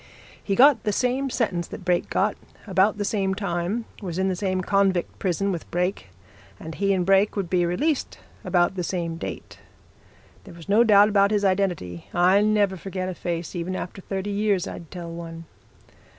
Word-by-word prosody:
He 200 - -1
got 265 -1 +6
the 210 - 0
same 255 +5 0
sentence 185 -9 -1
that - - -9
Brake 180 -2 +1
got, - - +1 0.3
about 195 +1 +2
the 205 - -2
same 195 -2 0
time, 200 +3 -2 0.2
was 180 -4 -5
in 190 +1 +1
the 185 - -1
same 185 0 -1
convict 195 -2 +1
prison 195 +1 0
with 170 -3 -5
Brake, 180 - -2 0.5
and 160 - -7
he 200 +3 0
and 185 -2 +1
Brake 195 +2 +3
would 195 -5 -3
be 175 -2 +2
released 290 - -1 0.3
about 175 0 +2
the 185 -2 -3
same 170 -2 -3
date. - - -7 0.8
There 185 -4 -13
was 170 0 -12
no 210 +4 +5
doubt 205 -2 +6
about 200 -1 +4
his 205 -1 +1
identity 180 - -1
I 185 +3 +5
never 210 -2 +2
forget 185 +1 -4
a - - -3
face, 170 0 -4
even 175 +2 -3
after 185 +1 -6
thirty 195 +2 -4
years 200 -2 0
I'd 170 - -8
tell 170 -2 -7
one. 165 0 -8
190 Hz, 185 wpm, -24 LUFS, 175-205 Hz, 0.8 s, got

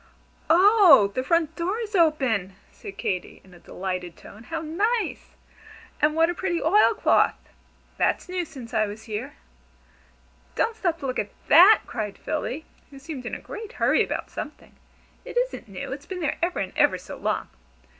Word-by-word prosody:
"Oh, 350 - +7
the 255 - -1
front 325 +2 +1
door 360 +5 -2
is 440 -2 -5
open!" 265 - +2 0.2
said 195 - -11
Katy, 185 -2 -3
in 185 - -19
a 175 - -15
delighted 180 -1 -5
tone. 215 +3 -14
"How 325 - -4
nice! 405 +9 -2 0.7
And 300 +1 +3
what 325 0 +4
a 350 - -1
pretty 345 -1 -2
oil 415 +7 +4
cloth. - - +3 0.6
That's - - 0
new 365 0 -2
since 265 -8 -11
I 215 -1 +2
was 210 +2 -8
here." 215 -1 -6 1.2
"Don't 455 - 0
stop 350 -6 -1
to - - -5
look 255 -1 -2
at 205 - -2 0.2
that!" 375 +7 +8
cried 210 -3 -5
Philly, 310 0 -4 0.2
who 275 - -13
seemed 270 -3 -7
in - - -4
a - - -7
great 440 +2 -9
hurry - - +3
about - - -5
something. - - -8 0.5
"It - - -7
isn't - - -1
new. 195 +3 -7
It's 280 +2 -7
been 370 -2 -5
there 305 - -2
ever 350 +1 0
and 190 -2 -3
ever - - +3
so - - -9
long! - - -2
310 Hz, 175 wpm, -25 LUFS, 220-360 Hz, 1.2 s, that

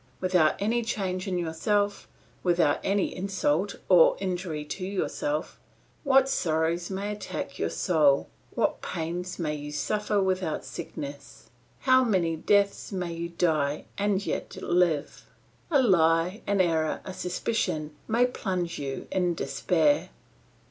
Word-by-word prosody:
Without 180 -4 +3
any 225 +4 +1
change 190 -4 -2
in 185 -2 -1
yourself, 200 +5 0 0.3
without 170 -5 +2
any 200 0 0
insult, 190 -1 0 0.2
any 175 -3 +7 0.2
injury 170 -4 -4
to 165 +5 -5
yourself, 290 +10 -2 0.4
what 270 -2 +5
sorrows 165 -5 0
may 200 +2 -3
attack 210 - -5
your - - 0
soul, 150 -6 +3 0.3
what - - 0
pains 175 +2 -4
may 155 -3 -1
you 145 0 -6
suffer 210 +8 0
without 185 -4 -1
sickness, 140 -1 -8 0.3
how 260 0 +5
many 180 -8 +1
deaths 200 +6 +1
may 180 -3 -3
you 170 +1 -4
die 155 -4 0
and 200 0 0
yet - - -3
live! 175 -5 +1 0.4
A 295 -5 +4
lie, 170 -1 +3
an 200 -1 +3
error, 160 -3 +1
a 185 - -6
suspicion, 180 -5 -2
may 235 +3 +3
plunge 185 -8 -3
you 135 -2 -5
in 180 -2 +1
despair. 165 - +1
180 Hz, 130 wpm, -27 LUFS, 160-200 Hz, 0.4 s, any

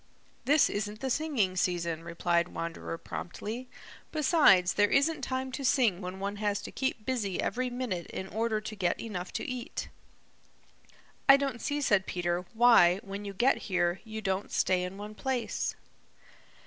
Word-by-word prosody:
"This 295 +1 +5
isn't 210 +1 -3
the 265 -1 -1
singing 250 -12 0
season," 170 -3 -1
replied 170 0 0
Wanderer 165 -1 -5
promptly. 225 +10 -6 0.4
"Besides, 290 - +5
there 205 0 +3
isn't 310 +4 +2
time 260 0 -3
to 275 +2 -5
sing 235 -8 +3
when 185 +1 -6
one 200 +1 -3
has 205 -1 0
to - - -7
keep 260 -5 -2
busy 220 -8 -1
every 255 +1 -1
minute 245 -9 -3
in 190 - -6
order 220 +1 -1
to 215 0 -6
get 180 -4 0
enough 185 -5 -5
to - - -3
eat." 255 +1 -5 1.4
"I 275 - +10
don't 275 -4 -3
see," 290 0 -1
said 205 -8 +2
Peter, 175 0 -2
"why, 220 -7 +6
when 200 +1 -6
you 200 - -5
get 255 +7 +3
here, 175 -1 +1
you 220 -1 -7
don't 190 0 -1
stay 185 -1 +2
in 180 +2 -5
one 210 +1 -7
place." 255 +2 -2
210 Hz, 160 wpm, -30 LUFS, 180-255 Hz, 1.4 s, I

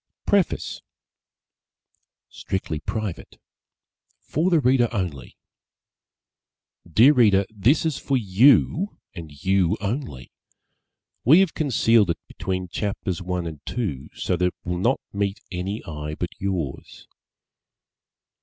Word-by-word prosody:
_ - - -68
PREFACE 200 -4 0 1.5
STRICTLY 90 -5 -4
PRIVATE 105 +1 -5 0.8
For 165 +5 -1
the 170 -3 +4
Reader 125 -3 +3
Only 90 - -4 1.5
DEAR 125 - +7
READER: 105 -7 +4
This 115 - +2
is 155 -4 -1
for 135 - 0
you, 130 - +3 0.2
and 80 -3 -9
you 95 +1 +2
only. 105 - -4 0.9
We 155 +10 +7
have 190 -4 +1
concealed 115 - +3
it 85 - -3
between 95 -1 -4
chapters 95 -2 -3
one 90 -1 -3
and 80 -4 -7
two 95 - -4
so 90 - -1
that 90 - +1
it - - -4
will 90 0 -3
not 120 +8 +2
meet 100 0 -1
any 95 +4 -4
eye 75 -1 -5
but 90 - -4
yours. 90 -8 -4
100 Hz, 115 wpm, -23 LUFS, 90-125 Hz, 1.5 s, DEAR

